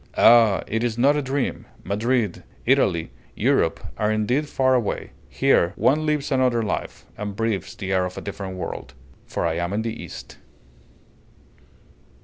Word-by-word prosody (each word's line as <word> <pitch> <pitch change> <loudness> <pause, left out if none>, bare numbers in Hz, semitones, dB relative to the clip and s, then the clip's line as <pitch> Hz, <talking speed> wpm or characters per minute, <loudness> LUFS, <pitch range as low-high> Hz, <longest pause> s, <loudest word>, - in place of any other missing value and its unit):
Ah! 115 -4 +6
it 110 +2 -2
is 120 -2 -1
not 140 +4 +4
a 150 - +1
dream! 135 0 -2 0.2
Madrid, 110 -1 0 0.2
Italy, 95 - +2 0.2
Europe, - - +2 0.2
are 105 0 +2
indeed 125 +8 0
far 130 -2 +2
away! 120 -5 -1 0.2
Here 85 +2 +2
one 155 +3 +2
lives 150 -1 0
another 125 -3 +2
life, 105 - -4
and 105 -1 -4
breathes 100 -3 -2
the 95 -1 -3
air 95 -1 +2
of 90 - -6
a - - -4
different 95 -2 -6
world, - - -6 0.3
for - - -2
I 85 -1 0
am 85 +2 -2
in 110 +2 -1
the 115 -1 -2
East. - - -9
110 Hz, 155 wpm, -23 LUFS, 95-130 Hz, 0.3 s, Ah